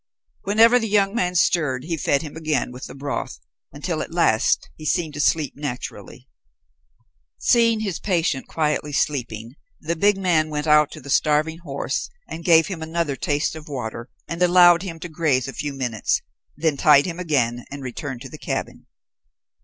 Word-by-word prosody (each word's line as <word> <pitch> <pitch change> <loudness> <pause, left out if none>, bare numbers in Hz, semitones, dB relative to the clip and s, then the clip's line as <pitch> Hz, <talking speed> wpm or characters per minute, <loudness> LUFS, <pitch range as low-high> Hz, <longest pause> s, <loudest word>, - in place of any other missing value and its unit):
Whenever 225 +5 +5
the 225 - -2
young 200 -1 +2
man 180 -6 0
stirred 150 -8 +2
he 165 +2 -2
fed 145 -1 0
him 150 -1 -8
again 155 -6 -1
with 125 +2 -8
the - - -11
broth, 140 0 -4 0.3
until - - -3
at - - -6
last - - +2
he - - -12
seemed 155 0 0
to 145 - -7
sleep 150 -1 +1
naturally. 140 -4 -7 1.1
Seeing 230 -2 +3
his 195 -6 -3
patient 170 -8 0
quietly 150 -2 -1
sleeping, 120 -5 -2 0.3
the 165 +2 -2
big 200 +4 +3
man 170 -5 +1
went 150 0 -3
out 150 -1 +5
to - - -10
the 140 - -7
starving 155 +3 +2
horse 140 -5 -3 0.2
and 165 - -7
gave 165 -2 +6
him 185 -5 -6
another 160 -2 -2
taste 145 +4 -1
of 160 -1 -10
water, 120 -3 -5 0.2
and 165 +1 -5
allowed 175 -1 +6
him 170 -4 -6
to 175 - -5
graze 155 -6 0
a 135 - -6
few 145 0 -4
minutes, 125 -5 -1 0.3
then 155 -2 0
tied 145 -1 +6
him 175 -1 -5
again, 125 -8 0
and 140 0 -8
returned 130 0 -6
to 135 - -8
the 155 - -11
cabin. - - -5
155 Hz, 175 wpm, -22 LUFS, 140-170 Hz, 1.1 s, gave